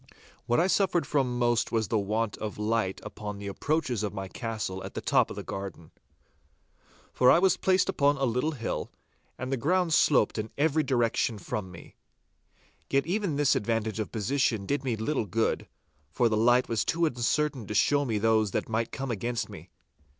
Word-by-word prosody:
What 120 - +3
I 170 - +4
suffered 185 -2 +2
from 130 -4 0
most 120 -1 +1
was 110 -3 0
the 110 - +2
want 105 +2 -1
of 105 -1 -5
light 105 -2 0
upon 105 -1 -6
the 100 - -8
approaches 125 +3 -1
of 105 -1 -3
my 95 -1 -4
castle 105 -3 -4
at - - -8
the - - -2
top - - +2
of - - -7
the - - -6
garden. 95 -4 -7 1.2
For 125 - +5
I - - +7
was 185 0 +4
placed 185 -1 +2
upon 140 0 +2
a 135 - -2
little 125 +6 0
hill, 115 -6 -4 0.5
and 130 +1 -5
the 135 - +1
ground 175 +6 +1
sloped 145 -6 +3
in 110 +1 -3
every 155 +1 +2
direction 120 -4 +1
from 100 -1 -4
me. 85 - -13 0.9
Yet 140 0 +2
even 185 -2 -1
this 145 -1 +3
advantage 110 0 -1
of 110 - -3
position 115 -2 0
did 140 +5 -1
me 125 -4 -1
little 110 +1 -1
good, 110 +4 0 0.4
for 115 - +2
the 110 - +1
light 120 +3 +4
was 115 -2 0
too 170 0 +1
uncertain 130 -2 0
to 105 - -4
show 145 +7 +3
me 115 -6 -1
those 110 0 +2
that - - -1
might 115 +1 -1
come 135 -2 -4
against 120 +1 -2
me. - - -11
115 Hz, 190 wpm, -28 LUFS, 110-140 Hz, 1.2 s, I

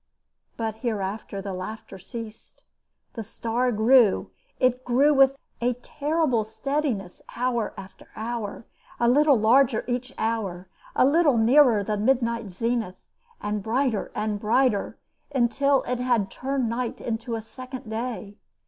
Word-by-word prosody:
But 220 -1 -3
hereafter 205 -3 -3
the 195 -1 -4
laughter 195 +1 -7
ceased. 225 +2 -9 0.5
The 230 - -5
star 230 +3 -1
grew 225 -1 +4 0.3
it 255 0 +2
grew 270 +5 +4
with 270 -1 +5 0.2
a 245 +1 +2
terrible 290 -1 0
steadiness 230 -4 -3
hour 240 -2 -1
after 195 0 -11
hour, 225 -1 -5 0.3
a 235 - +3
little 285 +2 +5
larger 235 +2 +4
each 250 +1 -2
hour, 200 -5 -2 0.3
a - - +5
little 290 -2 +4
nearer 235 -2 +5
the 210 +1 -2
midnight 235 -1 +1
zenith, 225 0 -2 0.5
and 210 0 -2
brighter 230 0 0
and 210 -1 -1
brighter, 225 0 +1 0.4
until 270 +3 +2
it 250 0 -2
had 240 -6 +1
turned 265 -1 -2
night 235 +1 -3
into 230 0 -3
a 225 - -4
second 255 +2 -9
day. 220 -2 -5
235 Hz, 130 wpm, -25 LUFS, 215-255 Hz, 0.5 s, with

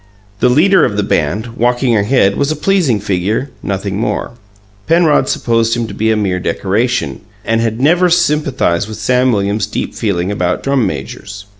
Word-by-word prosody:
The 125 - +3
leader 165 +7 +4
of 105 - 0
the 105 - +1
band, 105 +8 -1
walking 120 0 +1
ahead, 100 -2 +2
was 140 - 0
a 155 - -1
pleasing 155 - +1
figure, 105 +7 -2
nothing 100 0 -3
more. - - -2 0.6
Penrod 160 -4 +3
supposed 115 0 +1
him 120 - -1
to 105 - -8
be 110 +2 0
a 110 - +2
mere 95 -3 -1
decoration, 110 +7 -1 0.2
and 115 0 +1
had 115 0 -2
never 175 +6 +3
sympathized 150 - +1
with 110 - -7
Sam 125 0 +2
Williams' 100 0 0
deep - - -4
feeling 95 -3 -2
about 90 -3 -1
drum 135 -4 +1
majors. 80 +8 -7
115 Hz, 170 wpm, -14 LUFS, 100-135 Hz, 0.6 s, leader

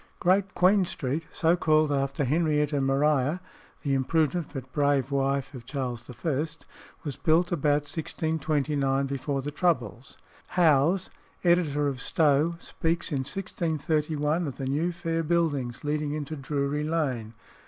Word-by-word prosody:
Great 190 +2 +2
Queen 190 +2 +5
Street, 155 -2 -3
so 165 +1 +2
called 155 -3 +3
after 140 0 0
Henrietta 150 0 +1
Maria, 140 +3 +2 0.4
the 140 -3 0
imprudent 155 +4 +1
but 135 -3 -8
brave 140 -2 +2
wife 140 0 0
of 125 -3 -8
Charles 125 -2 -4
I., 145 +4 -1 0.6
was 145 -4 -4
built 170 +3 +2
about 150 -3 +2
1629, 145 -3 -1
before 140 0 -2
the 145 - -3
troubles. 135 - -1 0.4
Howes 170 +2 +4 0.3
(editor 160 -5 +3
of 135 -3 -3
Stow) 155 +3 +2
speaks 165 +1 -2
in 140 - 0
1631, 155 -1 -1
of 135 - -6
"the 135 - -4
new 150 +6 0
fair 165 -1 -2
buildings 150 -7 0
leading 150 0 -1
into 155 0 -4
Drury 140 +1 -2
Lane." 130 -9 -2
150 Hz, 130 wpm, -27 LUFS, 135-165 Hz, 0.6 s, Queen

